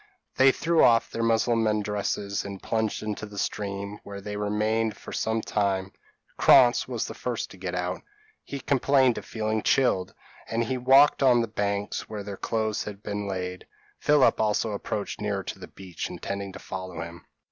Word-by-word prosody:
They 135 0 +7
threw 165 +4 +2
off 115 -1 +4
their 115 - -3
Mussulman 115 -2 +2
dresses, 100 -1 -2
and 100 -1 -7
plunged 110 0 -1
into 110 0 -4
the 105 0 -11
stream, 100 0 -3
where 100 0 -8
they 105 +1 -6
remained 105 +2 0
fur - - -10
some 110 0 -1
time. 95 -3 -1 0.5
Krantz 125 -2 +6
was 120 -3 -2
the - - -6
first 120 -2 -4
to - - -12
get 90 -1 -4
out: 90 0 -2 0.4
he 140 - -6
complained 135 -2 +3
of - - -13
feeling 110 -1 -2
chilled, 100 -9 +2 0.3
and 115 +1 0
he 130 +3 -2
walked 135 +4 +5
on 130 -2 +6
to 120 - +4
the 115 -2 -4
banks 100 -1 -2
where 105 -2 -5
their 100 0 -6
clothes 110 +1 -1
had 105 -1 -8
been 105 0 -3
laid. 90 -1 -4 0.3
Philip 145 -6 +4
also 110 +1 +1
approached 100 0 -4
nearer 100 -2 -1
to - - -6
the - - -9
beach, 95 -3 -7
intending 100 0 -5
to - - -8
follow 95 -3 -7
him. 85 +1 -11
105 Hz, 180 wpm, -26 LUFS, 100-115 Hz, 0.5 s, They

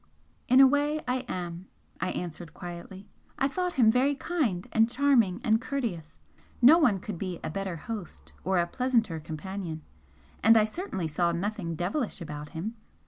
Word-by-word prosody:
"In 255 0 +6
a 270 - +10
way 290 +3 +2
I 250 +1 +1
am," 175 0 -5 0.3
I 185 - -1
answered, 170 -3 -6
quietly 180 +2 -8 0.3
"I 270 - +2
thought 360 +4 -2
him 230 -4 +5
very 265 +4 +2
kind 260 - -1
and 225 +1 +4
charming 245 -7 +3
and 220 +1 +3
courteous 220 - -4 0.4
no 285 +8 +8
one 230 - +3
could 185 -2 -6
be 185 -3 -4
a - - -3
better 195 0 -3
host 205 +1 -7
or 190 +1 +1
a 170 - +3
pleasanter 225 -4 0
companion. 160 +1 -6 0.6
And 225 +1 +7
I 215 - +5
certainly 215 - -4
saw 170 +3 +1
nothing 175 -1 -3
'devilish' 195 - -2
about 150 -3 -7
him. 205 +8 -5
200 Hz, 165 wpm, -28 LUFS, 175-255 Hz, 0.6 s, a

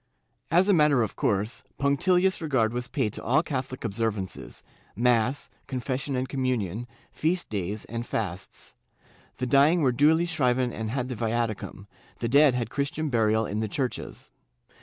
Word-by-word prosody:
^ - - -47 0.5
As 180 +4 +4
a 205 - +5
matter 150 -7 +4
of 110 - -4
course, 105 +4 -1 0.2
punctilious 180 +7 +2
regard 130 -8 +1
was 125 0 -3
paid 115 -6 -1
to - - -6
all 145 +7 +3
Catho 130 -5 -3
lic 130 - -7
observances 105 -3 -3 0.2
— - - -33 0.2
mass, 120 +4 0 0.2
confession 130 +2 -3
and 130 +1 -1
communion, 120 -5 -2 0.2
feast 175 +3 -1
days 100 +1 -3
and 115 0 -4
fasts. 95 - -5 0.6
The 125 - -2
dying 145 +6 +4
were 130 - +4
duly 155 +7 +4
shriven 130 -7 +1
and 110 -1 -4
had 125 +1 -2
the 125 - -4
viaticum, 115 -3 -2 0.3
the 115 - -2
dead 140 +1 +5
had 120 -3 -2
Christian 145 +3 -2
burial 110 -2 +2
in 105 +1 -3
the 110 - -1
churches. 125 +4 -4
125 Hz, 165 wpm, -27 LUFS, 110-145 Hz, 0.6 s, a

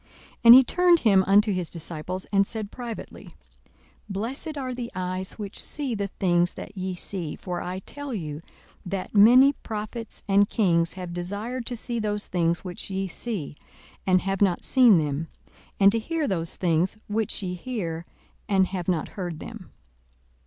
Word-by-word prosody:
42:010:023 - - -31 0.4
And 235 +1 +12
he 260 - +9
turned 350 +5 +4
him 195 -4 +5
unto 205 +1 +5
his 180 -3 -2
disciples, 170 +2 -4
and 195 -1 +3
said 215 -3 -5
privately, 235 -3 -8 0.7
Blessed 255 - -4
are 260 -2 -3
the 245 -1 -5
eyes 185 0 -3
which 205 -2 -6
see 280 -5 -3
the 200 -2 -2
things 175 -2 +1
that - - -9
ye 185 -1 -3
see: 175 -3 -5
42:010:024 - - -28
For 180 -2 -4
I 180 +1 -4
tell 285 +6 -7
you, 155 -8 -4 0.4
that 185 0 -4
many 245 +7 +7
prophets 220 -1 -7
and 200 +1 +4
kings 170 -6 +2
have 180 -2 -7
desired 205 +8 -4
to 245 - -2
see 235 +1 -2
those 210 -1 -1
things 170 -1 0
which 180 0 -6
ye 195 0 -2
see, 190 -5 -5 0.5
and 185 -1 +4
have 195 +1 -2
not 190 -4 +2
seen 245 -7 +6
them; 150 0 -1 0.5
and 195 0 +7
to 230 - 0
hear 320 +5 -2
those 170 -4 -1
things 175 +3 +1
which 210 -1 -1
ye 180 -1 -2
hear, 175 -5 -4 0.4
and 190 -2 +3
have 185 -3 -4
not 175 -4 0
heard 175 -5 -5
them. 220 -2 -9
195 Hz, 175 wpm, -25 LUFS, 180-230 Hz, 0.7 s, And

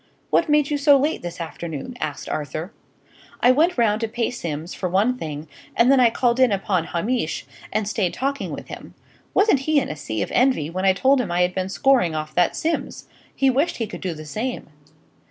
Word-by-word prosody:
"What - - +3
made 295 -1 +3
you 290 - 0
so 285 0 +6
late 295 +4 0
this 175 0 -7
afternoon?" 165 - -6
asked 150 -2 -4
Arthur. 155 - -4 0.7
"I 250 - +5
went 315 +6 +2
round 220 -2 +2
to 225 - 0
pay 230 +1 -2
Simms, 165 -7 -5
for 185 - -3
one 205 +8 +2
thing; 155 -8 -6 0.3
and 240 +3 +5
then 275 - +5
I 245 -2 +6
called 240 +1 +1
in 255 -3 +5
upon 195 -3 0
Hamish, 175 0 -2 0.3
and 215 -2 -1
stayed 205 -5 0
talking 275 +2 -2
with - - -7
him. - - -10 0.4
Wasn't 405 -8 +4
he 300 +2 +2
in - - -3
a 155 - -4
sea 110 -7 -3
of - - -6
envy 250 - +2
when 185 +2 -2
I 190 - +5
told 265 +7 +3
him 200 -8 -4
I 175 +1 +1
had 180 0 0
been 185 0 -2
scoring 240 - +2
off 155 0 -4
that 175 -1 +2
Simms! 330 0 -3 0.3
He 270 -1 +3
wished 280 +7 0
he 230 - -1
could - - -9
do 180 -3 -3
the 155 0 -9
same." 220 - -4
215 Hz, 215 wpm, -22 LUFS, 170-260 Hz, 0.7 s, so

